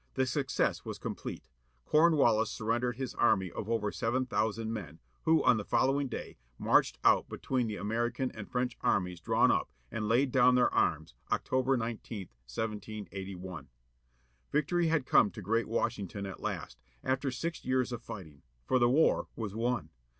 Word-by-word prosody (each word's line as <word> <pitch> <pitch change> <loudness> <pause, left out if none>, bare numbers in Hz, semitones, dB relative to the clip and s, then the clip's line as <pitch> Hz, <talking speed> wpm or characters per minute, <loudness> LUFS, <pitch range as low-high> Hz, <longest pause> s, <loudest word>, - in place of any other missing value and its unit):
The 130 - +2
success 135 +2 0
was - - -5
complete. - - -6 0.4
Comwallis 145 -9 +4
surrendered 120 +2 -1
his 130 0 -4
army 95 -6 +2
of 105 - -5
over 110 -3 0
seven 130 +3 0
thousand 110 -1 -1
men, 90 -8 -6 0.3
who 160 0 +4
on 120 - +5
the 105 - -3
following 135 +6 +2
day - - -6 0.2
marched - - +3
out - - +4
between 125 -3 -1
the 105 - -3
American 120 +6 -1
and 110 -2 -9
French 125 -1 -1
armies 90 -2 +1
drawn 85 - +3
up, - - 0 0.2
and 105 -1 -2
laid 125 +3 +3
down 125 0 +5
their 125 - +3
arms, - - +1 0.2
October 130 +1 +1
19, 115 -2 -4 0.3
1781. 95 - -6 0.8
Victory 165 +4 +2
had 160 -4 +1
come 105 - +5
to - - -10
great 115 +4 0
Washington 100 -3 -2
at 95 - -7
last, - - -5 0.2
after 135 +1 0
six 165 +7 -4
years 130 -1 +1
of 120 -1 -4
fighting; 95 -11 -9 0.2
for 130 - +2
the 120 0 +4
war 150 +6 +3
was 110 -4 -4
won. 120 +3 -1
115 Hz, 160 wpm, -31 LUFS, 105-130 Hz, 0.8 s, on